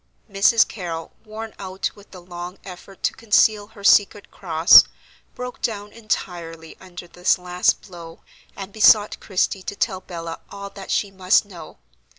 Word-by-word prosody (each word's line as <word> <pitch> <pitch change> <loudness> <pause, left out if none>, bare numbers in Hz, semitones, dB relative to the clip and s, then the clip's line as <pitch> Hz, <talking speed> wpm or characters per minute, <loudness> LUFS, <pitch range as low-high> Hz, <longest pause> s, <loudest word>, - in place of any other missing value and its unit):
Mrs. 205 +2 +3
Carrol, 170 -5 -7
worn 220 0 -8
out 190 -1 -4
with 205 -1 -18
the 185 -2 -13
long 175 +1 -8
effort 190 +1 -12
to - - +1
conceal 215 -1 +2
her 215 -2 -16
secret 205 0 +3
cross, 165 -3 +6 0.5
broke 250 0 -7
down 210 -3 -4
entirely 170 -7 -5
under 175 -2 -11
this 180 +1 +1
last 180 0 0
blow, 170 -3 -12 0.3
and 195 0 -9
besought 215 -1 +4
Christie 190 0 -1
to 200 - -6
tell 190 -3 -2
Bella 165 -2 -7
all 200 0 -9
that 195 -1 -11
she 200 - -1
must 190 +2 +2
know. 180 - -12
195 Hz, 155 wpm, -21 LUFS, 175-205 Hz, 0.5 s, cross